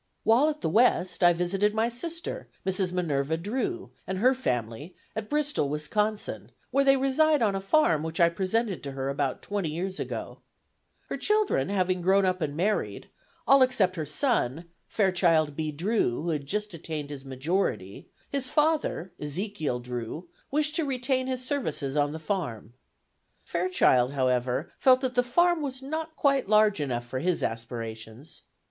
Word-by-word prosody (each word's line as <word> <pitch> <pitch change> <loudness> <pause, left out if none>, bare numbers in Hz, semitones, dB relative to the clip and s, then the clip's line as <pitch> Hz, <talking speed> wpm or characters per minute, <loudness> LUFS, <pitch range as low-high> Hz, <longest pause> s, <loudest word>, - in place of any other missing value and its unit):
While 245 +7 +4
at 300 0 -5
the - - -1
West, 190 -3 +2
I 175 - +8
visited 190 +5 0
my 220 +1 +2
sister, 335 - -5 0.2
Mrs. 190 -1 0
Minerva 160 -4 0
Drew, 265 - -3 0.2
and 190 - -2
her 250 +7 +4
family, 125 - -3 0.2
at 220 -1 -4
Bristol, 295 - 0
Wisconsin, 210 +9 -2 0.2
where 275 - +3
they 275 0 +5
reside 275 +1 +3
on 205 -3 +2
a 195 - -2
farm 195 - +3
which 160 +1 -5
I 170 - +7
presented 195 +3 -1
to 140 -1 -6
her 135 0 -3
about 140 -1 -2
twenty 200 -5 -2
years 185 +5 -4
ago. - - -5 0.7
Her - - -3
children 425 - +1
having 185 -2 0
grown 190 +2 +3
up 185 -1 0
and 150 -1 -2
married, 205 +5 -1 0.3
all 275 0 +6
except 210 -8 +3
her 155 -4 -4
son, 170 - 0 0.2
Fairchild 175 -7 +2
B. 155 0 -2
Drew, 165 - 0
who 170 - -2
had 145 -3 -3
just 210 +3 -2
attained 155 -3 -5
his 140 -2 -7
majority, 135 - -2 0.2
his 270 -2 0
father 300 - 0
(Ezekiel 155 - -3
Drew) 125 +7 -6 0.2
wished 300 +2 +1
to 330 - +1
retain 260 -1 0
his 255 -1 -3
services 160 - -2
on 145 -1 +2
the 160 - -5
farm. 150 - -4 0.7
Fairchild, 170 -8 +2
however, 130 +1 0
felt 260 -1 +5
that 260 -2 -1
the 245 - +3
farm 345 +7 +2
was 265 -2 -4
not 315 +3 -4
quite 275 -7 +1
large 215 -2 +4
enough 120 -4 -2
for 130 +2 -4
his 175 +4 0
aspirations. 115 +3 -5
185 Hz, 165 wpm, -27 LUFS, -, 0.7 s, I